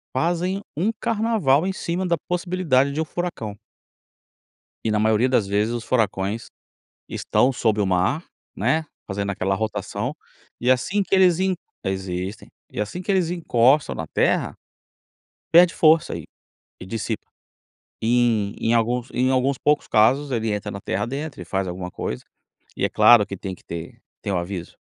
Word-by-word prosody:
fazem 175 +6 0 0.2
um 195 +8 +2
carnaval 215 -10 +2
em 190 - -1
cima 180 +1 -2
da 170 -2 +1
possibilidade 175 -7 +1
de 155 - -1
um 160 - -1
furacão. 150 - -4 1.3
E 110 - +1
na 105 - +2
maioria 110 +3 +3
das 125 -5 +2
vezes 105 +4 +1
os 120 - -3
furacões 105 -3 0 0.6
estão 130 - +1
sobre 110 -4 +1
o 100 - +2
mar, 95 - +1 0.3
né, 160 +1 +1 0.2
fazendo 100 0 -3
aquela 95 0 -1
rotação 110 +2 -3 0.4
e 125 +2 +3
assim 190 +11 +1
que 195 - -5
eles 185 -3 +5
en 190 -1 +1 0.3
existem, 95 0 -4 0.2
e - - -3
assim 140 - -4
que 195 - -1
eles 180 -3 +2
encostam 140 -5 +2
na 80 - -4
terra, - - +1 1.0
perde 170 +1 +7
força 160 0 +4
e - - -7 0.6
e 90 - -8
dissipa. 110 +1 -4 0.8
Em 115 -3 +2
em 115 +1 +2
alguns 120 +2 +1
em 130 +2 +1
alguns 130 +1 +2
poucos 150 +2 +1
casos 135 +7 +3
ele 115 -2 0
entra 105 -1 -3
na 100 - -6
terra 100 +2 -2
a - - -5
dentro 140 0 -5
e - - -6
faz 95 +2 -2
alguma 90 0 -5
coisa, 60 - -4 0.6
e - - +1
é - - 0
claro 120 -4 +6
que 100 - -6
tem 95 +1 -6
que - - -14
ter 85 0 -7 0.2
tem 100 - -3
aviso, 90 0 -4
120 Hz, 165 wpm, -23 LUFS, 100-160 Hz, 1.3 s, perde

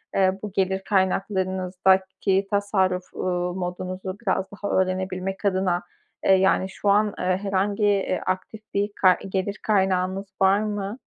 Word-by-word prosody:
eee, 190 0 +2
bu 210 - -4
gelir 190 0 0
kaynaklarınızdaki 190 0 +1
tasarruf, 190 -3 0
uuu, 180 -1 -1
modunuzu 185 +1 -4
biraz 190 -3 0
daha 205 0 -5
öğrenebilmek 190 +1 -1
adına, 185 -2 +1 0.4
eee, - - +5
yani, 190 0 +3
şu 200 +1 -2
an 210 +1 +3
herhangi, 195 +3 0
iii, 200 -2 +1
aktif 190 +4 -3
bir 205 +1 0
ka 185 -2 +6
gelir 195 +2 -2
kaynağınız 190 -1 +1 0.2
var 195 +1 +5
mı? 210 +1 -3
190 Hz, 130 wpm, -24 LUFS, 185-200 Hz, 0.4 s, ka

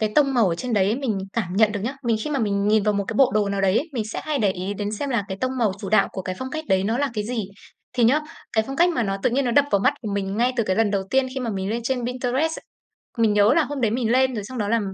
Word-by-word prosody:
cái 215 -1 0
tông 275 -2 +3
màu 230 -6 +4
ở 170 - 0
trên 245 +7 -4
đấy 205 +2 +2
mình 250 -7 -1
cảm 190 -5 -2
nhận 215 -1 +4
được 205 - -3
nhá. 240 +7 -3
Vì 230 - +3
khi 300 - -3
mà 285 - 0
mình 200 -3 0
nhìn 215 -1 +4
vào 210 0 +1
một 200 - 0
cái 225 - -3
bộ 265 0 +5
đồ 210 -1 +2
nào 200 0 -1
đấy 195 +1 +2
ấy, 310 - -4
mình 235 -5 -2
sẽ - - -3
hay 305 -2 -1
để 205 -5 +2
ý 185 +2 -4
đến 205 +1 -3
xem 275 +6 -3
là 230 -6 0
cái 190 - -4
tông 255 0 -1
màu 220 -5 +2
chủ 195 - -5
đạo 215 - +4
của 190 - -5
cái 185 -1 -4
phong 260 0 -5
cách 315 +2 -4
đấy 190 0 +3
nó 225 +4 0
là 285 -1 0
cái 210 -2 -2
gì. 230 -1 -2 0.5
Thì 245 -2 +2
nhớ, 270 +7 +4 0.3
cái 220 -1 +2
phong 270 - -5
cách 345 +3 +4
mà 320 -8 0
nó 195 -2 -1
tự - - +2
nhiên 270 +3 +1
nó 245 - +1
đập 285 +4 +4
vào 200 - +3
mắt 260 +8 +3
của 220 - -4
mình 195 0 -2
ngay 245 +3 +2
từ 235 - +2
cái 185 -2 0
lần 225 -2 +2
đầu 200 -1 0
tiên 265 0 +3
khi 265 - -3
mà 240 -2 -2
mình 195 -1 -3
lên 230 +2 -1
trên 245 -1 -1
Pinterest, 255 +6 -1 0.6
mình 225 -2 +3
nhớ 205 +1 +5
là 330 - +3
hôm 290 -2 -5
đấy 225 -3 +2
mình 230 -1 0
lên 260 +1 +3
rồi 210 -4 -4
xong 255 +5 -8
đó 210 -3 -1
là 230 +1 +3
225 Hz, 340 wpm, -23 LUFS, 205-260 Hz, 0.6 s, bộ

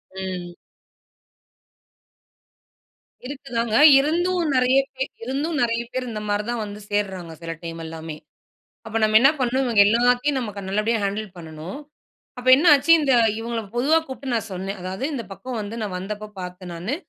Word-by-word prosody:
ம். 185 -2 -5 2.7
இருக்கு 275 0 -8
தாங்க. 230 -1 0 0.2
இருந்தும் 345 +3 +1
நிறைய 255 +1 +4 0.2
பே 265 - -1 0.2
இருந்தும், 285 +6 -2
நிறைய 230 0 +1
பேர் 255 -1 -3
இந்த 215 -1 -5
மாரி 205 0 0
தான் 240 -2 -2
வந்து 205 0 -8
சேர்றாங்க. 190 -5 -2
சில 165 0 -5
டைம் 165 0 -6
எல்லாமே. 160 -1 -7 0.7
அப்ப 220 0 -5
நம்ம 215 0 +4
என்னா 275 +3 +7
பண்ணனும்? 255 +2 +1
இவங்க 220 -4 +5
எல்லாத்தையும் 245 +5 +2
நமக்கு 210 -4 -5
நல்லபடியா 215 +3 +1
ஹேண்டுல் 205 0 -3
பண்ணனும். 165 - -8 0.6
அப்ப 250 +1 -3
என்ன 325 +5 +1
ஆச்சு? 285 +4 +1
இந்த 275 -3 +2 0.3
இவுங்கள 230 0 -3 0.2
பொதுவா 300 +7 +4
கூப்ட்டு 265 -1 -5
நான் 225 -1 -2
சொன்னேன். 195 +2 -5
அதாவது 190 +7 -5
இந்த 240 - -3
பக்கம் 250 +3 -6
வந்து 210 +2 -6
நான் 200 -3 -4
வந்தப்ப 210 +2 -6
பாத்தேன் 180 0 -8
நானு. 185 +11 -3
225 Hz, 155 wpm, -23 LUFS, 190-260 Hz, 2.7 s, என்னா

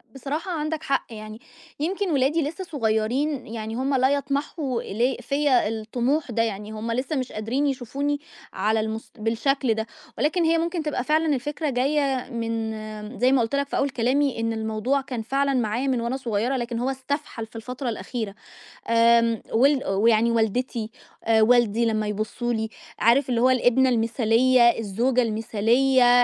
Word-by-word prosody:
بصراحة 295 +7 -4
عندَك 315 -1 -3
حق 275 -3 0
يعني، 215 -1 -9 0.4
يمكن 375 +4 -1
ولادي 285 +3 +2
لسّه 320 +6 -4
صغيرين، 260 0 -1
يعني 220 0 -5
هُم 265 +3 0
لا 260 0 +3
يطمحوا 280 -2 -1
ل 240 +5 0
فيّا 280 -5 +2
الطموح 240 +6 -1
ده 230 +1 +1
يعني، 210 -1 -4
هُم 220 +2 -4
لسّه 255 +6 -2
مش 260 -2 -2
قادرين 240 +7 -1
يشوفوني 280 +2 -2 0.3
على 220 +1 +1
المس 220 +1 -4
بالشكل 230 +3 +1
ده، 220 +1 -3 0.3
ولكن 320 +4 +1
هي 330 0 +3
ممكن 335 0 -1
تبقى 300 -5 -2
فعلًا 310 +1 +2
الفكرة 295 +4 -3
جايّة 270 0 0
من 220 -1 -4
زي 255 +2 +4
ما 270 - +4
قُلت 225 +4 -1
لك 280 0 0
في - - -3
أول 280 - +1
كلامي 260 +2 +1
إن 225 0 0
الموضوع 220 +5 -1
كان 255 -3 -5
فعلًا 275 +4 0
معايا 245 +1 0
من 255 -3 +1
وأنا 235 +3 -2
صغيّرة، 240 0 -1
لكن 240 -1 -3
هو 250 +2 0
استفحَل 270 -2 -4
في 220 - -25
الفترة 250 +3 -5
الأخيرة، 220 -1 -4 0.5
آمم 230 -1 +4
ول 270 +4 +4
ويعني 220 +4 +3
والدتي، 230 0 -1 0.3
آآ، 225 -1 +3
والدي 235 0 +4
لمّا 215 -2 0
يبصّوا 215 +3 -2
لي، 220 -1 -2 0.3
عارف 250 +5 +4
اللي 235 -2 +1
هو 255 - +5
الابنة 255 +1 +3
المثالية، 235 +2 +3 0.2
الزوجة 235 +5 +1
المثالية، 245 +3 +3
245 Hz, 160 wpm, -24 LUFS, 225-275 Hz, 0.5 s, هو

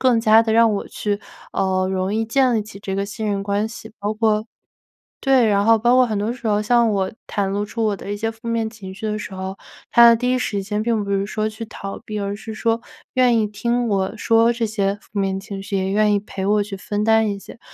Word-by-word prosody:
更 245 -3 +3
加 220 0 +6
地 225 -1 0
让 230 -1 +5
我 200 - -3
去， 205 0 -3 0.3
呃， 185 -1 +1
容 190 +1 -1
易 225 +1 +1
建 255 +2 +2
立 220 - +1
起 205 -2 -11
这 195 -1 -4
个 195 - -1
信 215 +2 -5
任 200 -1 -1
关 200 +2 -1
系， 220 -1 -10
包 210 +1 -2
括 215 0 +1 0.7
对， 265 -3 +4
然 200 -1 +2
后 225 +1 +6
包 240 +3 +3
括 255 -1 +5
很 215 - -2
多 215 +3 -1
时 240 -2 -7
候， 210 0 +2
像 235 +1 +3
我 190 -2 0 0.2
袒 200 -2 -1
露 205 +1 -1
出 225 +2 -3
我 210 -2 +1
的 195 - -10
一 - - -3
些 225 +2 -2
负 225 +1 -13
面 230 -1 -1
情 190 -4 -10
绪 215 +3 -5
的 215 0 -1
时 200 - -7
候， 190 +1 -5 0.3
他 235 0 +8
的 235 - +7
第 250 +2 0
一 255 - +2
时 205 -5 -2
间 210 +1 -2
并 225 -2 0
不 200 - -5
是 195 0 0
说 215 +1 -1
去 220 +1 -7
逃 195 -2 -7
避， 210 -1 -4
而 200 0 -2
是 220 +1 -8
说 230 +1 0 0.3
愿 250 -2 +4
意 215 - +2
听 235 +3 -1
我 195 +1 0
说 230 +2 +3
这 235 0 -2
些 200 -2 0
负 210 - -8
面 195 -1 0
情 195 0 -7
绪， 200 0 -3
也 190 0 -1
愿 210 +1 +3
意 205 - +1
陪 195 -2 -5
我 210 0 +3
去 200 -1 -6
分 205 +2 -3
担 220 0 +4
一 200 - -2
些。 200 - -12
215 Hz, 275 characters per minute, -21 LUFS, 200-225 Hz, 0.7 s, 他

